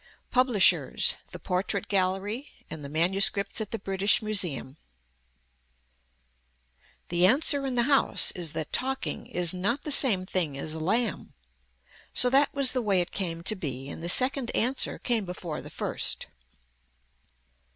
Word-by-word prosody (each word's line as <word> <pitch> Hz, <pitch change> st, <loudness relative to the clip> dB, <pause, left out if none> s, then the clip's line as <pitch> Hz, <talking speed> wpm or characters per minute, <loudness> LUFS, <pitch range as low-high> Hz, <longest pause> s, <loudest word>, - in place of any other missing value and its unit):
PUBLISHERS, 250 Hz, -6 st, +3 dB
THE -, -, -7 dB
PORTRAIT 190 Hz, +1 st, -2 dB
GALLERY 200 Hz, +7 st, -1 dB, 0.2 s
AND 155 Hz, -, -7 dB
THE 140 Hz, -, -8 dB
MANUSCRIPTS 195 Hz, +6 st, +1 dB
AT 215 Hz, -, -4 dB
THE 225 Hz, -, -4 dB
BRITISH 195 Hz, +1 st, +1 dB
MUSEUM 175 Hz, -10 st, -1 dB, 2.3 s
The 175 Hz, +1 st, +3 dB
answer 275 Hz, +3 st, +3 dB
in 260 Hz, -, -3 dB
the 240 Hz, -, +3 dB
house 275 Hz, +1 st, +4 dB
is 170 Hz, -5 st, -4 dB
that 155 Hz, -, -5 dB
talking 265 Hz, +1 st, -2 dB
is 175 Hz, 0 st, +2 dB
not 205 Hz, +10 st, -2 dB
the 300 Hz, -, -4 dB
same 215 Hz, -10 st, +2 dB
thing 170 Hz, -7 st, -2 dB
as 155 Hz, +3 st, -5 dB
a 160 Hz, -, -6 dB
lamb. 215 Hz, +6 st, -2 dB, 0.8 s
So 250 Hz, -, +3 dB
that 275 Hz, +2 st, +3 dB
was 275 Hz, -2 st, +4 dB
the 255 Hz, -, -1 dB
way 200 Hz, -5 st, +2 dB
it 175 Hz, -, -2 dB
came 170 Hz, -4 st, -4 dB
to 215 Hz, -, +1 dB
be 135 Hz, -7 st, -6 dB
and 160 Hz, -, -8 dB
the 170 Hz, -, -2 dB
second 255 Hz, +4 st, +3 dB
answer 255 Hz, +4 st, 0 dB
came 235 Hz, -4 st, -1 dB
before 180 Hz, -4 st, -6 dB
the -, -, -11 dB
first. -, -, -3 dB
195 Hz, 150 wpm, -27 LUFS, 175-245 Hz, 2.3 s, house